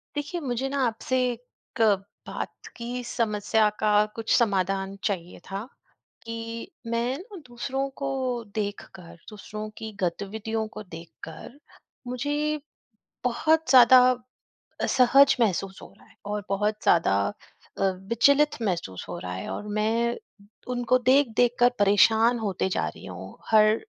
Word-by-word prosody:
देखिए 295 +4 -3
मुझे 260 -2 -2
ना 280 - -3
आपसे 235 +3 -2 0.6
क - - +2 0.5
बात - - -6
की 245 +1 -5
समस्या 215 -2 +1
का 215 -1 +2 0.2
कुछ 225 -1 -6
समाधान 195 -3 0
चाहिए 180 -4 -3
था, 195 +2 -3 0.6
कि 230 0 -6 0.2
मैं 235 +3 -1
ना 395 +4 -11
दूसरों 260 +3 -3
को 275 - -1 0.5
देखकर, 200 -4 -5
दूसरों 215 0 -7
की 220 0 -6
गतिविधियों 215 +5 -2
को 215 0 -9
देख 165 -3 -10 0.2
कर 165 - -11 0.5
मुझे 290 +4 -1 0.7
बहुत 315 +5 +2
ज़्यादा 255 -1 +9 0.8
असहज 270 +2 +5
महसूस 195 -3 0
हो - - -12
रहा - - -21
है - - -23
और 205 0 -3
बहुत 210 +2 +1
ज़्यादा 165 - +4 0.6
अ, - - +1
विचलित 230 +10 +2
महसूस 175 - -3
हो 90 - -4
रहा 90 +1 -5
है। 95 - -5
और 210 - -5
मैं 230 +2 +1 0.6
उनको 245 +1 +2
देख-देख 245 -3 +3
कर 245 0 +6
परेशान 220 +4 +4
होते 195 -3 -1
जा - - -1
रही - - -9
हूँ - - -9
हर 215 0 +6
225 Hz, 135 wpm, -26 LUFS, 200-250 Hz, 0.8 s, ज़्यादा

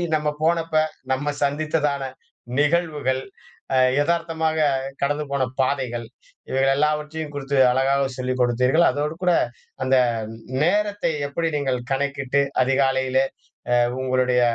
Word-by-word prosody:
நம்ம 150 -1 0
போனப்ப. 165 -1 +1 0.4
நம்ம 145 +2 -1
சந்தித்ததான 145 -1 0 0.6
நிகழ்வுகள். 150 -4 +1 0.5
அ - - +4 0.2
எதார்த்தமாக 160 0 0 0.4
கடந்து 145 +2 0
போன 140 -2 +1 0.2
பாதைகள். 125 -3 -1 0.4
இவைகள் 135 +1 +2
எல்லாவற்றையும் 150 +1 -1
குடுத்து 140 -1 -2
அழகாக 135 +1 +2
சொல்லிக் 130 0 -2
குடுத்தீர்கள். 125 +7 +3
அதோடு 150 +2 -2
கூட 180 - +4 0.5
அந்த 130 0 +3 0.7
நேரத்தை 205 +1 +1 0.2
எப்படி 165 +4 -2
நீங்கள் 130 -3 -1
கணக்கிட்டு 140 0 0 0.2
அதிகாலையிலே 130 0 +2 0.6
அ - - +4 0.2
உங்களுடைய 130 -1 +2
140 Hz, 105 wpm, -23 LUFS, 130-155 Hz, 0.7 s, அ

